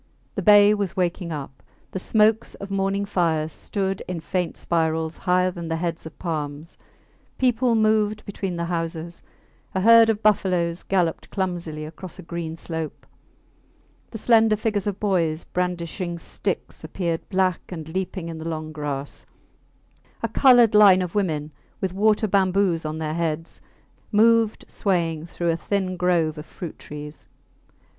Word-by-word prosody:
The -, -, -3 dB
bay 205 Hz, -1 st, +7 dB
was 200 Hz, -4 st, -2 dB
waking 175 Hz, -1 st, -1 dB
up. 140 Hz, -3 st, -7 dB, 0.3 s
The 190 Hz, -, -3 dB
smokes 220 Hz, +3 st, +2 dB
of 200 Hz, 0 st, -8 dB
morning 195 Hz, +1 st, 0 dB
fires 160 Hz, -5 st, 0 dB
stood 195 Hz, -1 st, -2 dB
in 180 Hz, -2 st, -3 dB
faint 180 Hz, +1 st, -2 dB
spirals 160 Hz, -1 st, 0 dB
higher 180 Hz, 0 st, +2 dB
than 170 Hz, -2 st, -7 dB
the 165 Hz, -, -1 dB
heads 165 Hz, -1 st, -3 dB
of 160 Hz, -, -13 dB
palms; 155 Hz, -1 st, -4 dB, 0.6 s
people 245 Hz, -1 st, +2 dB
moved 215 Hz, -1 st, +2 dB
between 195 Hz, -2 st, -4 dB
the 170 Hz, 0 st, -2 dB
houses; 170 Hz, 0 st, -4 dB, 0.5 s
a 190 Hz, -, +1 dB
herd 230 Hz, +2 st, +7 dB
of 220 Hz, -1 st, 0 dB
buffaloes 180 Hz, -5 st, +2 dB
galloped 180 Hz, -4 st, 0 dB
clumsily 175 Hz, -5 st, -3 dB
across 165 Hz, +3 st, -9 dB
a 185 Hz, -, -9 dB
green 165 Hz, -1 st, -5 dB
slope; 160 Hz, -2 st, -6 dB, 1.0 s
the 225 Hz, -, -6 dB
slender 225 Hz, -1 st, +4 dB
figures 210 Hz, -2 st, -1 dB
of 205 Hz, -1 st, -2 dB
boys 170 Hz, -6 st, +1 dB
brandishing 175 Hz, 0 st, -3 dB
sticks 180 Hz, +2 st, -4 dB
appeared 165 Hz, +1 st, -3 dB
black 185 Hz, -2 st, +1 dB
and 160 Hz, -4 st, -6 dB
leaping 185 Hz, 0 st, -3 dB
in 165 Hz, -1 st, -6 dB
the 160 Hz, +1 st, -4 dB
long 155 Hz, -1 st, -4 dB
grass; 145 Hz, -2 st, -5 dB, 1.0 s
a -, -, +2 dB
coloured 245 Hz, -5 st, +5 dB
line 200 Hz, -3 st, +7 dB
of 180 Hz, -, -5 dB
women, 155 Hz, -7 st, -1 dB, 0.3 s
with 190 Hz, -2 st, -2 dB
water 215 Hz, +2 st, +3 dB
bamboos 190 Hz, -3 st, +2 dB
on 155 Hz, 0 st, -3 dB
their 155 Hz, -1 st, -3 dB
heads, 165 Hz, -1 st, -3 dB, 0.5 s
moved 225 Hz, 0 st, +3 dB
swaying 165 Hz, -5 st, -1 dB
through 170 Hz, 0 st, -1 dB
a -, -, 0 dB
thin 185 Hz, +1 st, -2 dB
grove 170 Hz, -4 st, +1 dB
of 150 Hz, -, -8 dB
fruit 170 Hz, -4 st, -8 dB
trees. 150 Hz, 0 st, -8 dB
180 Hz, 150 wpm, -24 LUFS, 165-200 Hz, 1.0 s, bay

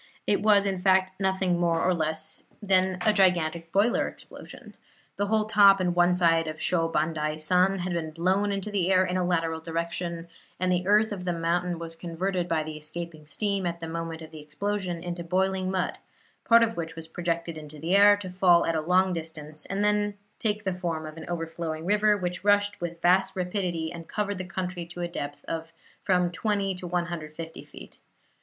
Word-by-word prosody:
It 205 Hz, -, +2 dB
was, 205 Hz, -2 st, +5 dB
in 190 Hz, -2 st, -1 dB
fact, 190 Hz, 0 st, +2 dB
nothing 190 Hz, -2 st, +1 dB
more 170 Hz, -1 st, +2 dB
nor 185 Hz, -, +3 dB
less 160 Hz, -1 st, -3 dB, 0.2 s
than 190 Hz, -2 st, +2 dB
a 215 Hz, -, +5 dB
gigantic 170 Hz, -4 st, +2 dB
boiler 205 Hz, +6 st, +2 dB
explosion. -, -, -11 dB, 0.4 s
The 205 Hz, -, 0 dB
whole 215 Hz, 0 st, +2 dB
top 200 Hz, -2 st, +6 dB
and 180 Hz, -1 st, +1 dB
one 175 Hz, 0 st, +4 dB
side 165 Hz, -2 st, +3 dB
of 155 Hz, 0 st, -5 dB
Sho 165 Hz, -1 st, +1 dB
Bandai 155 Hz, -1 st, -1 dB
san 180 Hz, +4 st, +3 dB
had 180 Hz, -1 st, -3 dB
been 165 Hz, -2 st, -2 dB
blown 185 Hz, +6 st, +1 dB
into 200 Hz, +1 st, -3 dB
the 190 Hz, -2 st, +1 dB
air 185 Hz, 0 st, +5 dB
in 180 Hz, -, -2 dB
a 185 Hz, -, +1 dB
lateral 165 Hz, -2 st, 0 dB
direction, 170 Hz, +1 st, -4 dB, 0.3 s
and 185 Hz, 0 st, +1 dB
the 180 Hz, 0 st, 0 dB
earth 215 Hz, +2 st, +4 dB
of 195 Hz, -3 st, -5 dB
the 180 Hz, -1 st, -1 dB
mountain 170 Hz, +1 st, -1 dB
was 165 Hz, 0 st, -6 dB
converted 175 Hz, +2 st, -3 dB
by 160 Hz, -2 st, 0 dB
the 155 Hz, 0 st, -6 dB
escaping 155 Hz, 0 st, -7 dB
steam, 200 Hz, +1 st, -1 dB
at 170 Hz, 0 st, -3 dB
the 165 Hz, -, -6 dB
moment 165 Hz, 0 st, -5 dB
of 160 Hz, -, -11 dB
the 155 Hz, -, -9 dB
explosion, 175 Hz, +2 st, -3 dB
into 175 Hz, 0 st, -4 dB
boiling 185 Hz, +2 st, 0 dB
mud, 185 Hz, -1 st, -2 dB, 0.5 s
part 230 Hz, 0 st, +6 dB
of 225 Hz, 0 st, -1 dB
which 165 Hz, -1 st, -4 dB
was 165 Hz, 0 st, -8 dB
projected 170 Hz, -1 st, -3 dB
into 155 Hz, -1 st, -10 dB
the 165 Hz, +6 st, 0 dB
air 205 Hz, 0 st, +7 dB
to 190 Hz, -3 st, -7 dB
fall 180 Hz, -2 st, +4 dB
at 165 Hz, -, 0 dB
a 160 Hz, -, 0 dB
long 180 Hz, +3 st, +3 dB
distance, 155 Hz, -2 st, -6 dB
and 195 Hz, +2 st, -1 dB
then 210 Hz, 0 st, +1 dB, 0.2 s
take 210 Hz, -1 st, -1 dB
the 190 Hz, -2 st, -1 dB
form 170 Hz, -3 st, -3 dB
of 155 Hz, 0 st, -8 dB
an 165 Hz, -, -9 dB
overflowing 165 Hz, -1 st, -4 dB
river, 210 Hz, +2 st, +3 dB
which 180 Hz, -1 st, -4 dB
rushed 205 Hz, -1 st, +2 dB
with 170 Hz, -1 st, -4 dB
vast 190 Hz, +2 st, +3 dB
rapidity 180 Hz, -3 st, -2 dB
and 165 Hz, -1 st, -9 dB
covered 205 Hz, -2 st, -2 dB
the 185 Hz, -, -4 dB
country 180 Hz, -1 st, -4 dB
to 175 Hz, +1 st, -8 dB
a 175 Hz, -, -1 dB
depth 145 Hz, -4 st, -6 dB
of 165 Hz, 0 st, -5 dB, 0.3 s
from 180 Hz, -2 st, +2 dB
20 200 Hz, +1 st, -1 dB
to 180 Hz, -1 st, -7 dB
150 170 Hz, -2 st, -4 dB
feet. -, -, -13 dB
175 Hz, 200 wpm, -27 LUFS, 165-190 Hz, 0.5 s, air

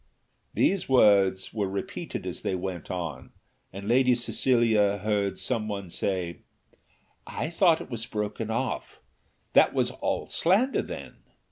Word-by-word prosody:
These 195 Hz, -6 st, +1 dB
words 100 Hz, -6 st, +4 dB
were 105 Hz, -3 st, -1 dB
repeated 95 Hz, 0 st, -5 dB
as -, -, -5 dB
they 95 Hz, -, -1 dB
went 90 Hz, -2 st, -5 dB
on, 85 Hz, -7 st, -5 dB, 0.4 s
and 100 Hz, +2 st, -8 dB
Lady 125 Hz, +1 st, +4 dB
Cecilia 115 Hz, -4 st, +2 dB
heard 100 Hz, -1 st, -1 dB
some 115 Hz, -4 st, -2 dB
one 100 Hz, -4 st, -5 dB
say, 90 Hz, -4 st, -2 dB, 0.9 s
"I 160 Hz, -, -4 dB
thought 170 Hz, -1 st, +4 dB
it -, -, -10 dB
was 115 Hz, 0 st, -4 dB
broken 105 Hz, 0 st, -3 dB
off; 115 Hz, -, -3 dB, 0.5 s
that -, -, +5 dB
was -, -, +1 dB
all -, -, -2 dB
slander 210 Hz, +11 st, +2 dB
then?" -, -, -8 dB
105 Hz, 135 wpm, -27 LUFS, 95-125 Hz, 0.9 s, that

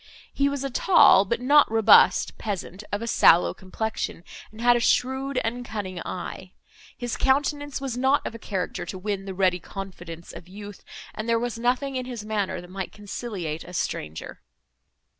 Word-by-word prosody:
He 280 Hz, 0 st, +2 dB
was 280 Hz, -1 st, -3 dB
a 275 Hz, -, -3 dB
tall, 275 Hz, -, +6 dB
but 235 Hz, +4 st, -1 dB
not 290 Hz, +3 st, +5 dB
robust, 225 Hz, -1 st, +5 dB
peasant, 200 Hz, -1 st, -5 dB
of 205 Hz, +2 st, -2 dB
a -, -, -4 dB
sallow 175 Hz, -6 st, +5 dB
complexion, 190 Hz, -2 st, -4 dB, 0.3 s
and 215 Hz, -, -14 dB
had 240 Hz, +1 st, +5 dB
a -, -, +2 dB
shrewd 265 Hz, +3 st, +1 dB
and 240 Hz, +2 st, -3 dB
cunning 195 Hz, -6 st, -5 dB
eye; 185 Hz, +1 st, -7 dB, 0.4 s
his 245 Hz, -2 st, -3 dB
countenance 290 Hz, +1 st, 0 dB
was 265 Hz, -3 st, -4 dB
not 265 Hz, +2 st, +2 dB
of -, -, -4 dB
a 230 Hz, -, -9 dB
character 190 Hz, -4 st, -3 dB
to 190 Hz, -, -6 dB
win 195 Hz, 0 st, -3 dB
the 190 Hz, -1 st, -6 dB
ready 180 Hz, -1 st, +2 dB
confidence 175 Hz, -4 st, -9 dB
of 175 Hz, -, -11 dB
youth, 205 Hz, +1 st, -10 dB, 0.3 s
and 215 Hz, +2 st, -5 dB
there 230 Hz, -, +3 dB
was 235 Hz, 0 st, -3 dB
nothing 255 Hz, +3 st, 0 dB
in 255 Hz, -1 st, -4 dB
his 235 Hz, -4 st, -6 dB
manner, 210 Hz, -3 st, -2 dB
that 180 Hz, 0 st, -13 dB
might 190 Hz, 0 st, -5 dB
conciliate 200 Hz, -6 st, -5 dB
a 180 Hz, -, -12 dB
stranger. 80 Hz, -, -4 dB
220 Hz, 180 wpm, -25 LUFS, 190-250 Hz, 0.4 s, tall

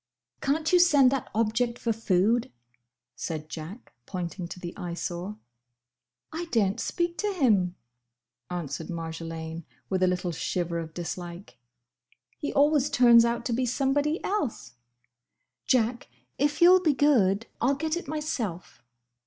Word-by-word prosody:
"Can't 310 Hz, +4 st, 0 dB
you 360 Hz, -, +7 dB
send 285 Hz, -7 st, +6 dB
that 270 Hz, -2 st, -2 dB
object 230 Hz, +2 st, +1 dB
for 230 Hz, -, -1 dB
food?" 220 Hz, +2 st, +1 dB, 0.6 s
said 155 Hz, 0 st, -5 dB
Jack, 165 Hz, +10 st, -8 dB
pointing 180 Hz, -1 st, -4 dB
to 180 Hz, -, -9 dB
the 175 Hz, -1 st, -7 dB
Eyesore. 175 Hz, +3 st, -5 dB, 1.0 s
"I 340 Hz, +2 st, -3 dB
daren't 225 Hz, -, +1 dB
speak 345 Hz, +6 st, -2 dB
to 420 Hz, -1 st, 0 dB
him," 210 Hz, -, +2 dB, 0.7 s
answered 165 Hz, -3 st, -4 dB
Marjolaine, 165 Hz, -1 st, -5 dB, 0.3 s
with 185 Hz, -1 st, 0 dB
a 185 Hz, -, +4 dB
little 180 Hz, -1 st, -1 dB
shiver 170 Hz, +1 st, -2 dB
of 160 Hz, -1 st, -7 dB
dislike. 175 Hz, 0 st, -7 dB, 0.8 s
"He 295 Hz, -, -3 dB
always 290 Hz, 0 st, +3 dB
turns 240 Hz, -4 st, +6 dB
out 235 Hz, 0 st, -1 dB
to 240 Hz, -, -1 dB
be 250 Hz, +2 st, 0 dB
somebody 285 Hz, +5 st, +1 dB
else. 285 Hz, -, -2 dB, 0.9 s
Jack! 240 Hz, -1 st, +1 dB, 0.3 s
if 290 Hz, +4 st, +2 dB
you 350 Hz, -, +9 dB
'll 370 Hz, -, +7 dB
be 310 Hz, -6 st, +2 dB
good, 230 Hz, -8 st, +3 dB, 0.2 s
I 245 Hz, -, +3 dB
'll 280 Hz, -, +2 dB
get 315 Hz, +3 st, -1 dB
it 350 Hz, -, -5 dB
myself!" 255 Hz, -, -4 dB
230 Hz, 140 wpm, -27 LUFS, 175-285 Hz, 1.0 s, you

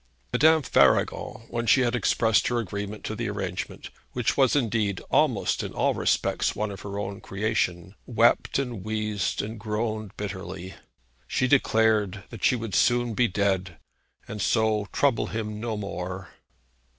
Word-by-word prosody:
Madame 160 Hz, 0 st, +5 dB
Faragon, 115 Hz, -, +2 dB
when 115 Hz, -1 st, -2 dB
she 130 Hz, -, +5 dB
had 120 Hz, -1 st, +1 dB
expressed 115 Hz, -2 st, +2 dB
her 120 Hz, -, 0 dB
agreement 100 Hz, -1 st, -4 dB
to -, -, -3 dB
the 115 Hz, -1 st, -3 dB
arrangement, 95 Hz, -3 st, -5 dB, 0.2 s
which 125 Hz, 0 st, 0 dB
was 135 Hz, -2 st, +4 dB
indeed 110 Hz, -7 st, +1 dB
almost -, -, +2 dB
in -, -, -5 dB
all -, -, +1 dB
respects -, -, 0 dB
one 105 Hz, -1 st, -2 dB
of 95 Hz, -, -8 dB
her 100 Hz, 0 st, -6 dB
own 100 Hz, -1 st, -4 dB
creation, 95 Hz, -3 st, -1 dB
wept 115 Hz, -1 st, +3 dB
and 120 Hz, -8 st, -3 dB
wheezed 105 Hz, -3 st, -1 dB
and 110 Hz, +2 st, -6 dB
groaned 110 Hz, -1 st, -3 dB
bitterly. 95 Hz, -2 st, -6 dB, 0.5 s
She 130 Hz, -, +1 dB
declared 110 Hz, -6 st, +2 dB
that 115 Hz, -5 st, -9 dB
she 125 Hz, -, +4 dB
would 115 Hz, -4 st, -5 dB
soon 120 Hz, +2 st, +2 dB
be 120 Hz, +2 st, +3 dB
dead, 95 Hz, -3 st, -1 dB, 0.5 s
and 105 Hz, -1 st, -5 dB
so 110 Hz, -2 st, +1 dB
trouble 135 Hz, -6 st, +2 dB
him 105 Hz, -1 st, -4 dB
no 110 Hz, -1 st, -3 dB
more. 95 Hz, -2 st, -5 dB
110 Hz, 150 wpm, -26 LUFS, 100-115 Hz, 0.5 s, Madame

